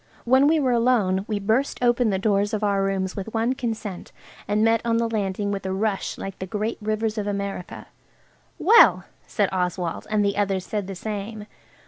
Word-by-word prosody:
When 260 Hz, +3 st, +5 dB
we 315 Hz, +1 st, +3 dB
were 260 Hz, -3 st, +1 dB
alone 230 Hz, -6 st, +2 dB
we 215 Hz, -, -1 dB
burst 225 Hz, +7 st, 0 dB
open 240 Hz, -1 st, +3 dB
the 195 Hz, -, +1 dB
doors 205 Hz, +1 st, +1 dB
of 215 Hz, -, -4 dB
our 200 Hz, -1 st, +2 dB
rooms 190 Hz, -1 st, -1 dB
with 210 Hz, +3 st, -6 dB
one 230 Hz, +3 st, +1 dB
consent, 225 Hz, -7 st, -5 dB, 0.4 s
and 210 Hz, +1 st, +1 dB
met 225 Hz, 0 st, +3 dB
on 230 Hz, -1 st, +1 dB
the 230 Hz, 0 st, +1 dB
landing 200 Hz, -2 st, -2 dB
with 200 Hz, -1 st, -3 dB
a 190 Hz, -, -3 dB
rush 200 Hz, +1 st, -2 dB
like 195 Hz, -1 st, -7 dB
the 190 Hz, -, -5 dB
great 215 Hz, +4 st, -3 dB
rivers 215 Hz, +1 st, -1 dB
of 205 Hz, -, -3 dB
America. 200 Hz, -2 st, -4 dB, 0.7 s
"Well!" 460 Hz, +5 st, +6 dB, 0.2 s
said 205 Hz, -3 st, 0 dB
Oswald, 180 Hz, -2 st, -2 dB
and 210 Hz, -1 st, +2 dB
the 200 Hz, 0 st, 0 dB
others 195 Hz, -2 st, 0 dB
said 205 Hz, -3 st, -3 dB
the 195 Hz, -, -6 dB
same. 210 Hz, +2 st, -5 dB
210 Hz, 190 wpm, -24 LUFS, 195-225 Hz, 0.7 s, Well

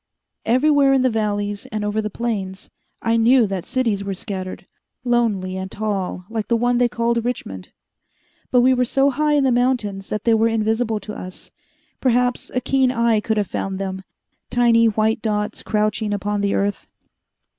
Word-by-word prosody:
Everywhere 275 Hz, +3 st, +4 dB
in 265 Hz, -1 st, +3 dB
the 255 Hz, -, +3 dB
valleys 205 Hz, -2 st, -2 dB
and 215 Hz, -1 st, -3 dB
over 210 Hz, +1 st, 0 dB
the 215 Hz, -, -3 dB
plains, 200 Hz, -5 st, -4 dB, 0.3 s
I 230 Hz, 0 st, +2 dB
knew 235 Hz, +1 st, +5 dB
that 195 Hz, -3 st, -4 dB
cities 225 Hz, -6 st, 0 dB
were 195 Hz, -1 st, -3 dB
scattered, 185 Hz, -2 st, -6 dB, 0.4 s
lonely 220 Hz, -7 st, 0 dB
and 190 Hz, 0 st, -5 dB
tall 195 Hz, -4 st, -3 dB
like 220 Hz, -1 st, -4 dB
the 235 Hz, -, +2 dB
one 245 Hz, +1 st, +1 dB
they 245 Hz, -1 st, +3 dB
called 235 Hz, 0 st, 0 dB
Richmond. 100 Hz, -, -5 dB, 0.8 s
But 250 Hz, -, +4 dB
we 260 Hz, +1 st, +5 dB
were 250 Hz, 0 st, +2 dB
so 270 Hz, +3 st, +2 dB
high 300 Hz, +2 st, +1 dB
in 290 Hz, -1 st, +3 dB
the 265 Hz, -, +3 dB
mountains 240 Hz, -6 st, 0 dB
that 210 Hz, -, -3 dB
they 230 Hz, -, +3 dB
were 225 Hz, +1 st, +3 dB
invisible 225 Hz, 0 st, 0 dB
to 210 Hz, +2 st, -7 dB
us 185 Hz, 0 st, -9 dB, 0.5 s
perhaps 250 Hz, -1 st, +1 dB
a 255 Hz, -, +1 dB
keen 260 Hz, 0 st, +2 dB
eye 235 Hz, -3 st, +2 dB
could 220 Hz, +1 st, -1 dB
have 210 Hz, -, +1 dB
found 195 Hz, 0 st, -4 dB
them, 190 Hz, -1 st, -4 dB, 0.5 s
tiny 235 Hz, -1 st, +4 dB
white 220 Hz, +1 st, +1 dB
dots 210 Hz, -1 st, -2 dB
crouching 210 Hz, 0 st, 0 dB
upon 205 Hz, 0 st, -2 dB
the 200 Hz, 0 st, +1 dB
earth. 200 Hz, +1 st, -1 dB
220 Hz, 175 wpm, -21 LUFS, 205-245 Hz, 0.8 s, knew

